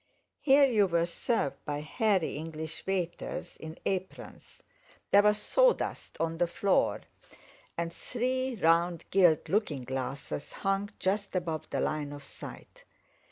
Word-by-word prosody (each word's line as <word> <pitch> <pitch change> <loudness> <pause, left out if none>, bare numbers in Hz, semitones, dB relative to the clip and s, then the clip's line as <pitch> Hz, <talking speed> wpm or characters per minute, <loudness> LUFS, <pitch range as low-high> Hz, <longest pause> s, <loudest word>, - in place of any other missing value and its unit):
Here 280 0 +6
you 215 -7 +3
were 170 -1 +2
served 170 - -1
by 145 0 -3
hairy 195 - +1
English 160 +1 -6
waiters 180 -3 -3
in 160 +1 -8
aprons; 190 -1 -5 0.5
there 200 - +8
was 210 0 +4
sawdust - - +1
on 165 0 -1
the 175 - +3
floor, 195 +3 +1 0.8
and 170 0 -2
three 255 +3 -2
round 170 -2 +2
gilt 175 -5 +4
looking 185 - 0
glasses 135 +2 -4
hung 195 +1 -1
just 195 +1 -1
above 165 -3 -2
the - - -1
line 150 -2 -2
of 145 -1 -9
sight. - - -11
175 Hz, 130 wpm, -30 LUFS, 160-205 Hz, 0.8 s, there